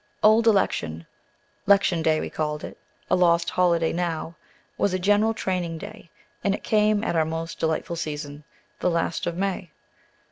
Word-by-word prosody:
"Old 220 +2 +5
Election," 85 - +1 0.6
"'Lection 195 -4 +4
Day" 155 -1 +2
we - - -5
called 150 -1 -3
it, - - -7 0.4
a - - +6
lost 170 -1 +3
holiday 170 -2 +2
now, 170 -1 -2 0.4
was 200 -2 +1
a - - +1
general 205 +4 +2
training 180 -5 -2
day, 165 - -10 0.3
and 200 0 +2
it - - -11
came 215 -1 +2
at 200 - -1
our 160 - +3
most 165 +1 -5
delightful 160 +1 -1
season, 150 -2 -5 0.4
the - - +1
last 170 0 -1
of 170 0 -3
May. 190 -2 -2
170 Hz, 165 wpm, -25 LUFS, 160-195 Hz, 0.6 s, a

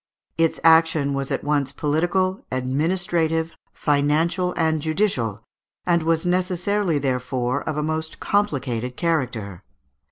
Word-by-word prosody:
Its 165 -1 +1
action 160 -3 +4
was 135 0 -2
at - - -2
once 145 -2 0
political, 175 +6 0
administrative, 160 +5 0 0.2
financial, 155 +5 +1
and 160 -2 +1
judicial, 145 - -1 0.4
and 170 -1 +3
was 165 +1 +1
necessarily, 180 0 +1
therefore, 125 -1 -1
of 155 - -3
a 150 - 0
most 160 +1 -3
complicated 130 - -1
character. 120 - -2
155 Hz, 115 wpm, -23 LUFS, 135-170 Hz, 0.4 s, action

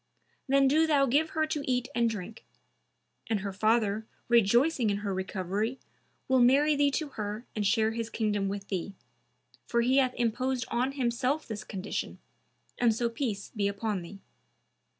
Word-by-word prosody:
Then 275 0 +4
do 315 +4 +4
thou 285 -3 +4
give 290 +5 +2
her 315 - +3
to 310 -1 -2
eat 250 0 0
and 235 -1 +2
drink. 220 0 -7 0.9
and 215 -3 0
her 200 0 -4
father, 215 +1 +1 0.2
rejoicing 235 +3 +4
in 200 - 0
her 200 - -1
recovery, 195 +5 -2 0.5
will 260 0 +3
marry 280 +5 +5
thee 285 0 +3
to 300 +1 -2
her 215 -1 -5
and 210 -2 0
share 220 +1 +2
his 230 0 -4
kingdom 205 -4 -1
with 200 0 -6
thee; 195 +1 -3 0.7
for 235 - +2
he 255 +3 +3
hath 255 -2 +3
imposed 250 +2 -1
on 255 +3 0
himself 260 +3 -1
this 215 -2 -5
condition 195 0 -5 0.6
and 235 -3 +3
so 235 +1 0
peace 230 -4 -4
be 205 -2 +1
upon 200 -1 -2
thee." 195 +4 -11
230 Hz, 165 wpm, -29 LUFS, 205-260 Hz, 0.9 s, marry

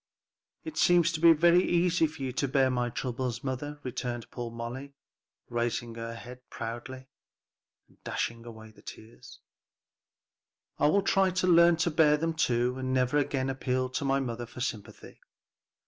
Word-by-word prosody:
"It 320 -1 -8
seems 175 -1 +4
to 160 - -3
be 170 +1 +7
very 170 +2 +5
easy 175 -1 +2
for 155 -2 -9
you 130 - -2
to 140 - -1
bear 130 0 +2
my 125 -1 -1
troubles, 125 0 -4
mother," 145 +3 -4
returned 120 -2 -5
poor 120 -1 -5
Molly, 120 +4 -7 0.5
raising 120 0 -2
her 115 0 -6
head 125 +2 -10
proudly, 120 +3 -7 0.8
and - - -29
dashing 115 0 -3
away 110 -2 -11
the - - -20
tears, 110 +1 -13 1.4
"I - - +4
will 200 +6 +3
try 195 -1 +3
to 185 0 -1
learn 170 -1 +6
to 170 +1 +1
bear 150 -1 +4
them 165 +2 -1
too, 125 -4 0
and 130 0 -3
never 130 +3 +2
again 135 -2 -1
appeal 130 -1 -1
to 125 +2 -3
my 135 0 +1
mother 120 -2 -4
for 125 - -12
sympathy." 110 -5 -6
130 Hz, 160 wpm, -29 LUFS, 120-160 Hz, 1.4 s, be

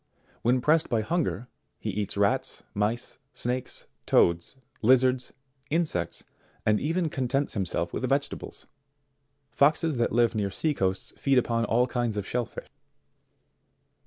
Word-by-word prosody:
When 125 +2 +2
pressed 155 +4 +3
by 115 -3 +2
hunger, 145 -1 -1 0.3
he 110 - -3
eats 100 0 -3
rats, 100 0 +1
mice, 105 +4 -2
snakes, 125 +1 -3 0.2
toads, 85 +7 +3 0.3
lizards, 130 +1 +3 0.4
in 165 +3 +2
sects, 90 - -4 0.4
and 105 -1 +3
even 165 +4 0
contents 135 0 0
himself 95 -5 -2
with - - -2
vegetables. - - -2 0.9
Foxes 150 0 +3
that 120 - +1
live 120 -1 +3
near 105 -3 0
sea 150 +11 0
coasts 95 -6 -1
feed 135 -1 +2
upon 115 -1 +2
all 120 +2 +3
kinds 120 -3 -1
of 100 - -2
shell 120 0 -1
fish. - - -9
120 Hz, 135 wpm, -27 LUFS, 105-135 Hz, 0.9 s, pressed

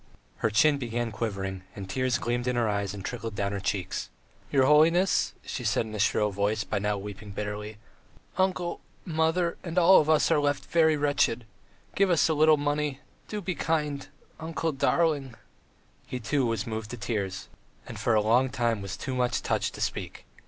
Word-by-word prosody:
Her 115 - +1
chin 140 +7 +4
began 120 -2 -2
quivering, 100 -3 -3
and 100 -2 -7
tears 130 +4 0
gleamed 120 +1 -2
in 125 - +1
her 120 -2 +1
eyes 100 -1 -1
and 95 - -7
trickled 115 -3 -5
down 100 0 -1
her 100 - -2
cheeks. 95 -2 -3 0.4
"Your 135 -2 +4
holiness," 165 +6 +4
she - - -5
said - - +1
in 110 - -9
a 105 - -4
shrill 105 +1 +2
voice, 105 +2 0
by - - -2
now 105 +1 0
weeping 105 +1 -8
bitterly, 105 +1 -5 0.6
"uncle, 185 -2 0 0.2
mother 165 +1 +1
and 170 0 -5
all 180 +2 +7
of 155 - -3
us 155 +1 +4
are 160 - +4
left 145 -1 0
very 160 -2 +3
wretched.... 145 -5 +1 0.5
Give 195 -1 +3
us 170 -3 +4
a 160 - +1
little 155 0 +5
money... 145 -1 -1 0.3
do 210 -1 -4
be 180 -1 -2
kind... 150 -4 -1 0.3
uncle 160 0 -2
darling... 145 -3 +1 0.4
." - - -35
He, 125 - -4
too, 130 +2 0
was 115 +1 -1
moved 110 -2 -5
to 120 - -6
tears, 100 -3 -3 0.4
and - - -8
for 115 - +2
a 105 - +4
long 125 +5 +3
time 120 -5 0
was 100 -1 -5
too 135 - -4
much 125 -1 0
touched - - -1
to - - -8
speak. - - -4
125 Hz, 190 wpm, -27 LUFS, 105-155 Hz, 0.6 s, all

